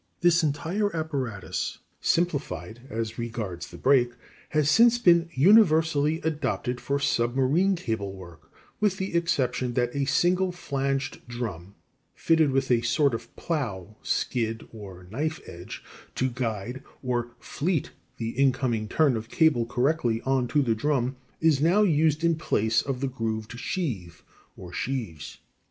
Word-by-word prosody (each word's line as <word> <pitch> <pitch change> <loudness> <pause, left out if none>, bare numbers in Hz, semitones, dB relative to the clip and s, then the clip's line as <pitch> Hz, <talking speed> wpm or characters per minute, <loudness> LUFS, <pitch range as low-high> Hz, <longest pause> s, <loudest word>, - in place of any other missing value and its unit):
" - - -44
This 175 0 +5
entire 170 +7 -1
apparatus 135 - -3 0.2
simplified 120 - -1
as 115 0 -4
regards 110 -7 -4
the - - -11
brake 125 -3 +3 0.4
has 150 -2 +1
since 230 +9 +6
been 170 -6 +4
universally 160 -3 +4
adopted 135 -5 -2
for 140 - 0
submarine 135 +8 +2
cable 110 - -3
work, 85 -4 -13 0.3
with 205 -3 +1
the 190 -1 -3
exception 130 -7 0
that 120 0 0
a 140 -1 +1
single 180 +6 +2
flanged 140 -5 -2
drum, 100 -7 -6 0.4
fitted 160 -2 +3
with 135 -1 0
a 120 -1 +4
sort 135 +3 +2
of 115 - -6
plow, 110 - -3
skid, 115 -2 -1
or 95 -5 -10
knife 155 +7 -2
edge 85 +1 -9 0.3
to 130 0 0
guide 120 +1 -3 0.2
or 120 -2 -2
"fleet" 160 +6 -2 0.3
the 115 -1 -3
incoming 125 -3 +1
turn 145 +1 +3
of 110 +1 -5
cable 135 -8 +3
correctly 125 -2 +1
on 130 -2 +1
to 145 +4 +2
the 115 -3 +2
drum 130 +1 0 0.3
is 160 -4 +3
now 180 +7 +4
used 155 -3 +2
in 170 0 +4
place 115 -8 +1
of 130 -2 -4
the 135 - 0
grooved 115 -2 -4
sheave, 100 - -4 0.3
or 90 -2 -10
sheaves. 105 - -4
130 Hz, 140 wpm, -26 LUFS, 115-160 Hz, 0.4 s, since